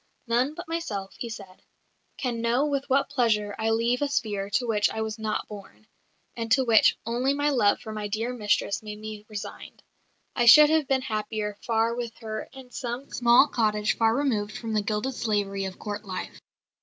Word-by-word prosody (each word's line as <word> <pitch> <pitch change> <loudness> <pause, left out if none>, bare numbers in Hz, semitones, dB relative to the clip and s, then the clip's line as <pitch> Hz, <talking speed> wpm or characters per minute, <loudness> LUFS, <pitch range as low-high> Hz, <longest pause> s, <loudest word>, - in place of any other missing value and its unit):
"None 250 +5 +1
but 350 0 -8
myself," 220 -13 -4
he 235 - -4
said, 195 -4 -10 0.6
"can 240 -4 -2
know 240 +5 +2
with 280 -2 -2
what 275 +1 +2
pleasure 215 -6 +1
I 220 0 +1
leave 230 +3 +1
a 290 - +2
sphere 205 -8 -2
to 245 +5 0
which 210 -3 +2
I 220 - -4
was 220 0 -4
not 215 -1 -2
born, 205 0 -11 0.5
and 230 -1 -5
to 265 - +4
which 225 -3 +5
only 250 +4 0
my 290 +1 +1
love 215 -7 +3
for 220 - -7
my 210 -1 -4
dear 225 +4 -2
mistress 205 -3 0
made 210 -1 -7
me 215 -1 -8
resigned. 210 -2 -8 0.5
I 240 -1 +2
should 300 +5 +9
have 315 -3 +2
been 265 -2 +1
happier 215 -3 -3
far 230 0 +1
with 235 -1 -5
her 215 -1 -5
in 260 -2 -13
some 245 +2 -5
small 240 +2 +5
cottage 210 -5 0
far 225 0 +2
removed 220 -7 -1
from 225 -1 -5
the 215 - +2
gilded 210 +6 -2
slavery 200 -4 -1
of 190 0 -6
Court 210 0 -5
life." 185 -3 -6
225 Hz, 195 wpm, -26 LUFS, 210-250 Hz, 0.6 s, should